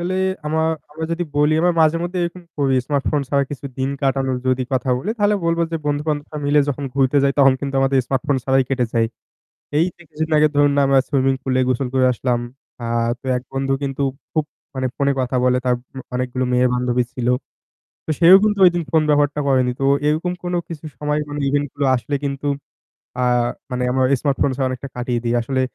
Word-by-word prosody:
আসলে 180 +2 -2 0.3
আমরা 160 +1 0 0.5
যদি 175 +1 -1
বলি 150 +1 +4
আমরা 175 0 +3
মাঝে 155 +1 +3
মধ্যে 180 +1 -3
এরকম 175 +1 -6 0.2
করি 135 -2 +2
স্মার্ট 140 -2 0
ফোন 150 -2 +1
ছাড়া 140 -1 +2
কিছু 140 -1 -7
দিন 135 +1 0
কাটানোর 135 -1 +1
যদি 130 0 +2
কথা 130 0 0
বলি 195 +12 -3
তাহলে 205 0 +3
বলবো 170 0 +1
যে - - +1
বন্ধু 145 0 0
বান্ধবরা 150 0 -3
মিলে 145 +1 +4
যখন 140 0 -2
ঘুরতে 135 0 +2
যাই 140 - +3
তখন 135 -1 +6
কিন্তু 140 -1 -4
আমাদের 135 0 +2
স্মার্ট 135 0 -1
ফোন 140 -2 +2
ছাড়াই 135 0 +3
কেটে 130 -2 +1
যায়। 115 -1 +2 0.7
এই 160 - +4
যে 175 - -16
কিছুদিন 160 +2 -4
আগে 155 0 +5
ধরুন 145 0 +4
না - - +4
আমরা 135 0 +4
সুইমিং 135 -1 +2
পুলে 130 -1 +1
গোসল 130 0 0
করে 130 -1 +4
আসলাম। 120 0 -1 0.4
আ - - -4 0.4
তো - - -12
এক 125 - -4
বন্ধু 135 0 -1
কিন্তু 140 0 -2 0.3
খুব 155 -2 +1 0.3
মানে 130 0 -1
ফোনে 140 0 +2
কথা 130 0 -1
বলে 125 0 +3
তার 125 -1 +3 0.4
অনেকগুলো 125 0 -1
মেয়ে 125 +1 +4
বান্ধবী 125 0 +1
ছিল। 120 -1 -2 0.8
তো - - -10
সেও 175 +3 +9
কিন্তু 210 -2 +1
ঐদিন 175 -1 +1
ফোন 160 -1 +4
ব্যবহারটা 145 0 +2
করেনি। 130 -2 +3
তো 135 - 0 0.2
এরকম 160 +4 0
কোনো 175 0 -1
কিছু 165 -2 -8
সময় 150 +1 -1
মানে 145 0 -4
ইভেন্ট 145 +1 +1
গুলো 140 - -1
আসলে 125 +4 -3
কিন্তু 140 +1 -3 0.7
আ - - +2 0.5
মানে 125 0 -1
আমার 130 0 +2 0.2
স্মার্টফোন 140 -1 +1
ছাড়া 135 -1 0
অনেকটা 130 +2 -5
কাটিয়ে 120 -1 -1
দেই। 120 - +1
আসলে 130 +2 -1
140 Hz, 205 wpm, -20 LUFS, 130-150 Hz, 0.8 s, সেও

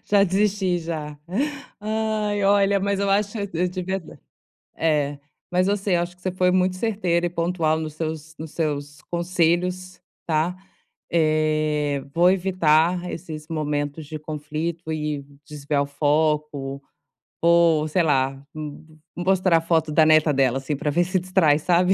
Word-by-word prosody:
Já 200 -1 +4
desisti, 195 -1 +1
já. 155 -3 -5 0.6
Ai, 215 -1 -1
olha, 200 0 +4
mas 200 0 0
eu 200 0 +1
acho, 205 +2 +1 0.2
eu 180 +2 +1
tive 185 +1 -3
azar 190 -4 -7 0.6
é, 145 -3 +1 0.3
mas 180 +1 +2
você, 200 -2 +1
eu 170 - +2
acho 175 +1 -5
que 180 - -29
você 185 0 -2
foi 180 0 +2
muito 185 0 +2
certeira 185 -5 0
e - - 0
pontual 165 -2 0
nos 155 -1 -5
seus 155 0 -5
nos 160 -1 -8
seus 145 -3 -3
conselhos, 180 +1 0 0.2
tá. 165 +2 0 0.6
Eh, 155 -3 +1
vou 175 +2 +5
evitar 180 -2 +2
esses 155 -2 -7
momentos 150 -1 -2
de 155 +1 -7
conflito 155 +2 -4
e 150 -2 -3 0.2
desviar 145 -1 -1
o - - -4
foco, 145 -1 0 0.6
ou 170 -2 +4
sei 170 +3 +1
lá, 135 -3 +1
m 155 0 -7 0.3
mostrar 185 -1 +3
a - - 0
foto 160 -2 +1
da 155 +1 +5
neta 155 -1 +5
dela, 135 -2 +2
assim, 135 +2 -3
pra 145 +2 -2
ver 175 +4 +3
se 185 +1 0
distrai, 180 -5 +3
sabe. 180 +3 +3
165 Hz, 155 wpm, -23 LUFS, 150-185 Hz, 0.6 s, vou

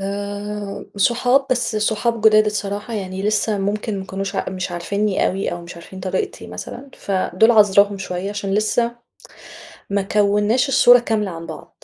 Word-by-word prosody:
آآ، 205 +1 -5
صحاب 245 +6 +2
بس 245 -3 0
صحاب 220 +2 0
جداد 215 0 +6
الصراحة 205 +2 -3
يعني 190 -2 -4
لسه 210 0 +1
ممكن 205 +1 -2
ما 190 - -6
كانوش 195 +1 -4
مش 185 -1 -3
عارفينّي 200 +4 0
أوي، 195 +1 -2
أو 175 0 -6
مش 170 - -10
عارفين 190 +2 -11
طريقتي 195 - -3
مثلًا، 270 +3 -8
فدول 195 +2 +1
عذراهم 205 -2 +4
شوية 190 +1 -4
عشان 200 -1 -3
لسه 235 +3 +1 0.9
ما 200 0 +1
كوّناش 210 +5 +2
الصورة 245 -2 +7
كاملة 215 -5 -1
عن 165 0 -8
بعض. - - -11
205 Hz, 150 wpm, -20 LUFS, 195-220 Hz, 0.9 s, الصورة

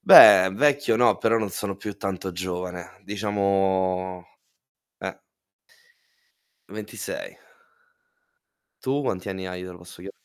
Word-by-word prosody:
Beh, 95 +1 +9
vecchio 145 0 +2
no, 120 +1 +4
però 115 0 +2
non 105 -3 -3
sono 100 +2 -4
più 100 0 -7
tanto 95 -1 -4
giovane. 90 +1 -6
Diciamo 95 -3 -1 0.8
eh. - - -6 1.5
26. - - -7 1.4
Tu 135 +2 0
quanti 95 -8 -3
anni 95 0 -6
hai, 90 0 -6
te 90 - -8
lo 90 - -12
posso 90 0 -14
chie 95 +2 -8
95 Hz, 115 wpm, -24 LUFS, 90-105 Hz, 1.5 s, Beh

